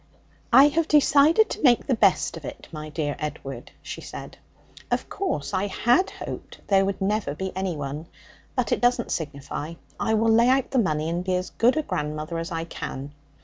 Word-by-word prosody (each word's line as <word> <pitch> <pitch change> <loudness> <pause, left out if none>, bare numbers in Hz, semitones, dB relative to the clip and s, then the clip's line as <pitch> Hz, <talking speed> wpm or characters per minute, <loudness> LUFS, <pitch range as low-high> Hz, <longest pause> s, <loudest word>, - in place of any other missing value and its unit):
'I 270 +4 +8
have 320 +2 0
decided 300 +7 +5
to - - -5
make 245 -5 +4
the 270 - +1
best 230 - +3
of - - -9
it, - - -8
my 155 -1 -7
dear 150 -1 -2
Edward,' 135 -4 -6
she - - -7
said; - - -9 0.5
'of - - -1
course, 145 - -3
I 190 +2 +1
had 240 - +2
hoped - - -8
there 195 -1 +3
would 195 -1 -2
never 200 -6 -1
be 190 +2 -5
anyone. 155 -5 -3 0.5
But 250 -3 0
it - - +1
doesn't 245 -1 +2
signify. 150 +1 -4 0.2
I 220 - +1
will 225 +1 +3
lay 235 +2 +5
out 265 0 +2
the 265 - +2
money 155 -7 0
and 170 +2 -2
be 185 0 0
as 180 0 -3
good 245 +6 +3
a 310 - +1
grandmother 155 - -3
as 165 +2 -5
I 165 -1 -2
can. 145 -3 -6
190 Hz, 190 wpm, -25 LUFS, 155-245 Hz, 0.5 s, I